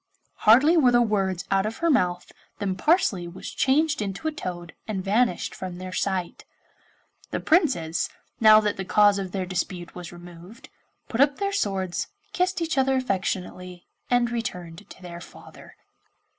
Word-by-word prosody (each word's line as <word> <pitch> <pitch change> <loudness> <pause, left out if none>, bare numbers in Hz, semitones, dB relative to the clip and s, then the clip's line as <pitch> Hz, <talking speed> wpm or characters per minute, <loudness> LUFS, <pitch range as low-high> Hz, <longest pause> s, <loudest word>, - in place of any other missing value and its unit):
Hardly 270 +10 +7
were 270 -6 +5
the 240 - +5
words 195 -4 -1
out 195 +1 +2
of 225 - -5
her 335 - +1
mouth 180 -9 0 0.3
than 195 -2 -2
Parsley 195 - +2
was 170 +2 -8
changed 300 +1 +2
into 200 +9 -4
a - - 0
toad 175 - -6
and 195 -4 -3
vanished 215 0 +1
from 185 -2 -7
their 185 0 -7
sight. 185 -2 -2 0.9
The - - -2
Princes, 260 - +1 0.3
now 215 -1 +8
that 210 -1 -1
the 190 - -3
cause 205 +1 +4
of 190 -2 -5
their 190 -1 -2
dispute 180 -1 -4
was 175 -1 -8
removed, 175 +5 -13 0.4
put 235 - -1
up 280 0 +4
their 400 0 -2
swords, 190 - -1 0.3
kissed 360 -1 0
each 325 -4 0
other 265 0 +2
affectionately, 185 -6 -3 0.2
and 245 -1 +2
returned 180 -5 -5
to - - -13
their 170 -1 -8
father. - - -14
195 Hz, 160 wpm, -25 LUFS, 180-250 Hz, 0.9 s, now